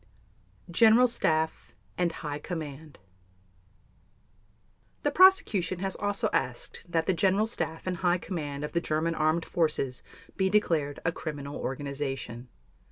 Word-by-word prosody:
GENERAL 225 Hz, +6 st, +6 dB
STAFF 160 Hz, -8 st, 0 dB, 0.2 s
AND 175 Hz, -1 st, +1 dB
HIGH 150 Hz, -2 st, -5 dB
COMMAND 155 Hz, -3 st, -7 dB, 2.1 s
The 290 Hz, -, +2 dB
Prosecution 285 Hz, -, +4 dB
has 190 Hz, +1 st, -2 dB
also 205 Hz, -1 st, 0 dB
asked -, -, -2 dB
that 165 Hz, -1 st, +1 dB
the 190 Hz, -, +2 dB
General 195 Hz, +4 st, +2 dB
Staff 165 Hz, -8 st, -4 dB
and 185 Hz, -1 st, -2 dB
High 180 Hz, -1 st, +2 dB
Command 150 Hz, -6 st, -5 dB
of 150 Hz, -, -4 dB
the 170 Hz, -, 0 dB
German 160 Hz, +1 st, 0 dB
Armed 160 Hz, +1 st, +1 dB
Forces 150 Hz, -7 st, -1 dB, 0.3 s
be 190 Hz, -1 st, +1 dB
declared 160 Hz, -9 st, +1 dB
a 165 Hz, -, +3 dB
criminal 145 Hz, -3 st, -6 dB
organization. 135 Hz, -3 st, -4 dB
165 Hz, 125 wpm, -28 LUFS, 150-190 Hz, 2.1 s, GENERAL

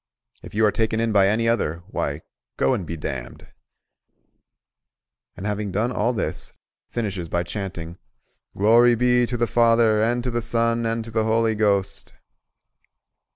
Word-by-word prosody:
If -, -, -11 dB
you 110 Hz, +1 st, +3 dB
are 105 Hz, -, +4 dB
taken 110 Hz, +1 st, 0 dB
in 115 Hz, 0 st, 0 dB
by 100 Hz, -2 st, +4 dB
any 110 Hz, +3 st, +1 dB
other, 85 Hz, -8 st, 0 dB
why, 70 Hz, +2 st, -3 dB, 0.4 s
go 65 Hz, -, +2 dB
and 90 Hz, -, -3 dB
be 85 Hz, -, -5 dB
damned;" -, -, -6 dB, 1.9 s
and 95 Hz, -, -7 dB
having 105 Hz, -1 st, -2 dB
done 110 Hz, +6 st, 0 dB
all 120 Hz, 0 st, 0 dB
this, 120 Hz, -, -4 dB, 0.4 s
finishes 100 Hz, -7 st, -3 dB
by 85 Hz, +1 st, 0 dB
chanting 85 Hz, -2 st, -6 dB, 0.6 s
"Glory 120 Hz, +4 st, +5 dB
be 125 Hz, 0 st, +2 dB
to 120 Hz, -, -3 dB
the 120 Hz, -, +1 dB
Father, 115 Hz, -2 st, +3 dB
and 120 Hz, +2 st, +1 dB
to 125 Hz, -, -2 dB
the 120 Hz, 0 st, -1 dB
Son, 115 Hz, 0 st, 0 dB
and 115 Hz, 0 st, -2 dB
to 115 Hz, -, -9 dB
the 110 Hz, -1 st, 0 dB
Holy 110 Hz, 0 st, +2 dB
Ghost!" 100 Hz, -2 st, 0 dB
110 Hz, 155 wpm, -23 LUFS, 100-115 Hz, 1.9 s, Glory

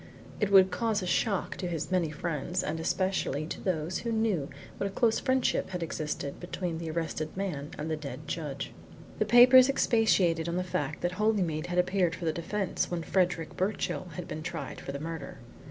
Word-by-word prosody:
It 210 Hz, -2 st, +1 dB
would 190 Hz, -1 st, +7 dB
cause 220 Hz, -4 st, 0 dB
a -, -, -2 dB
shock 195 Hz, +2 st, 0 dB
to 180 Hz, -, -3 dB
his 165 Hz, -1 st, -3 dB
many 180 Hz, -4 st, +2 dB
friends, 165 Hz, +3 st, -2 dB
and 160 Hz, -, -2 dB
especially 185 Hz, -3 st, 0 dB
to -, -, -6 dB
those 170 Hz, -2 st, -1 dB
who 235 Hz, -, -3 dB
knew 220 Hz, -10 st, 0 dB, 0.3 s
what 200 Hz, -, 0 dB
a -, -, -3 dB
close 225 Hz, +3 st, +2 dB
friendship 260 Hz, -1 st, +1 dB
had 180 Hz, -2 st, -3 dB
existed 150 Hz, -3 st, -4 dB
between 175 Hz, -2 st, -4 dB
the 165 Hz, -1 st, -4 dB
arrested 160 Hz, 0 st, -3 dB
man 155 Hz, -7 st, -3 dB
and 150 Hz, -, -4 dB
the 160 Hz, -, 0 dB
dead 150 Hz, 0 st, -7 dB
judge. 145 Hz, -4 st, -4 dB, 0.5 s
The -, -, +3 dB
papers 255 Hz, +2 st, +8 dB
expatiated 190 Hz, -11 st, +3 dB
on 170 Hz, -, -2 dB
the 180 Hz, -, 0 dB
fact 150 Hz, -5 st, -3 dB
that 175 Hz, -, 0 dB
Holymead 185 Hz, -6 st, 0 dB
had 175 Hz, 0 st, -3 dB
appeared 180 Hz, -1 st, +2 dB
for 175 Hz, -, -6 dB
the 160 Hz, -, +1 dB
defence 185 Hz, +3 st, -2 dB
when 175 Hz, -2 st, -2 dB
Frederick 175 Hz, -2 st, 0 dB
Birchill 190 Hz, 0 st, -1 dB
had 180 Hz, -, -5 dB
been 155 Hz, -, -5 dB
tried 155 Hz, -3 st, -5 dB
for -, -, -5 dB
the 140 Hz, -, -5 dB
murder. 165 Hz, +1 st, -6 dB
175 Hz, 195 wpm, -29 LUFS, 160-195 Hz, 0.5 s, papers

